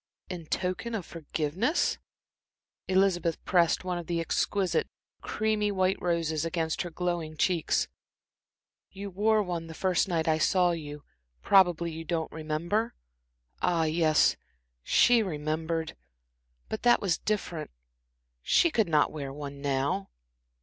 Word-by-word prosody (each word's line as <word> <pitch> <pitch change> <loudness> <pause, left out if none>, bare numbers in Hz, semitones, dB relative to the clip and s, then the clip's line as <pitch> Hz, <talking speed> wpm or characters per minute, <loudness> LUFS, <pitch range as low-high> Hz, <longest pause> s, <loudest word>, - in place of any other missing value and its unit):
"In 170 -3 -7
token 185 +8 -2
of 195 -6 -4
forgiveness?" 165 - -1 0.9
Elizabeth 185 -3 +2
pressed 175 -2 +3
one 180 -1 -2
of 170 - -8
the 170 -1 -1
exquisite, 175 +1 0 0.3
creamy 215 -1 0
white 190 -1 +1
roses 165 -3 0
against 165 -1 -1
her 175 - -4
glowing 170 -2 -3
cheeks. 170 0 +1 1.0
"You 200 +1 -7
wore 215 +3 +2
one 170 -3 -4
the 160 - -9
first 185 +1 +1
night 165 -3 -1
I 160 0 +2
saw 180 +1 +3
you 150 -3 -6 0.4
probably 175 -3 +4
you 160 +1 -6
don't 165 -1 -2
remember?" 165 +9 -2 0.7
Ah, 170 -2 +2
yes, 155 -1 +3 0.5
she 240 - +4
remembered 160 -2 -2 0.7
but 220 - -4
that 240 0 +5
was 185 -5 0
different. 185 -7 -2 0.7
She 340 - +3
could 220 - +1
not 150 -2 +3
wear 140 -3 -5
one 140 0 -7
now. 135 -7 -1
170 Hz, 130 wpm, -28 LUFS, 160-190 Hz, 1.0 s, that